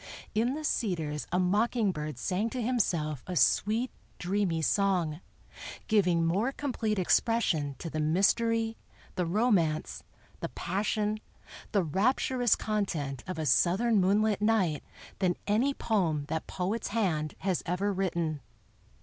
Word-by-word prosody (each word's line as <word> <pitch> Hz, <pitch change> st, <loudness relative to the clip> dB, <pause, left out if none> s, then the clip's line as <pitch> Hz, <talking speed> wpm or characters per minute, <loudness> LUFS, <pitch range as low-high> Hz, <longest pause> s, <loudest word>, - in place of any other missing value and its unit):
In 235 Hz, +5 st, +1 dB
the 310 Hz, -, -5 dB
cedars 165 Hz, -, -1 dB
a 180 Hz, -, +1 dB
mocking 210 Hz, +3 st, +2 dB
bird 150 Hz, -5 st, -5 dB
sang 190 Hz, -, -1 dB
to 255 Hz, -, -5 dB
himself 170 Hz, -, 0 dB
a 180 Hz, -, -4 dB
sweet, 215 Hz, -, +2 dB, 0.3 s
dreamy 180 Hz, -3 st, 0 dB
song, 175 Hz, 0 st, +1 dB, 0.7 s
giving 180 Hz, -6 st, +3 dB
more 200 Hz, +10 st, +1 dB
complete 235 Hz, -7 st, -2 dB
expression 175 Hz, -, +1 dB
to -, -, -6 dB
the 155 Hz, -1 st, -3 dB
mystery, 225 Hz, +8 st, +2 dB, 0.4 s
the 180 Hz, -2 st, -1 dB
romance, 175 Hz, -6 st, +1 dB, 0.4 s
the -, -, -4 dB
passion, 210 Hz, +3 st, -1 dB, 0.5 s
the 200 Hz, -3 st, +2 dB
rapturous 240 Hz, -, +2 dB
content 160 Hz, -, -2 dB
of 185 Hz, -, -4 dB
a 160 Hz, -, -2 dB
Southern 200 Hz, +8 st, +3 dB
moonlit 205 Hz, +2 st, +2 dB
night 210 Hz, -8 st, +2 dB, 0.4 s
than 180 Hz, -3 st, +2 dB
any 225 Hz, +7 st, +2 dB
poem 175 Hz, -, 0 dB
that 160 Hz, -, -3 dB
poet's 195 Hz, +5 st, -2 dB
hand 170 Hz, -9 st, -1 dB
has 190 Hz, -3 st, 0 dB
ever 195 Hz, +4 st, 0 dB
written. 170 Hz, -5 st, -1 dB
190 Hz, 130 wpm, -29 LUFS, 165-220 Hz, 0.7 s, giving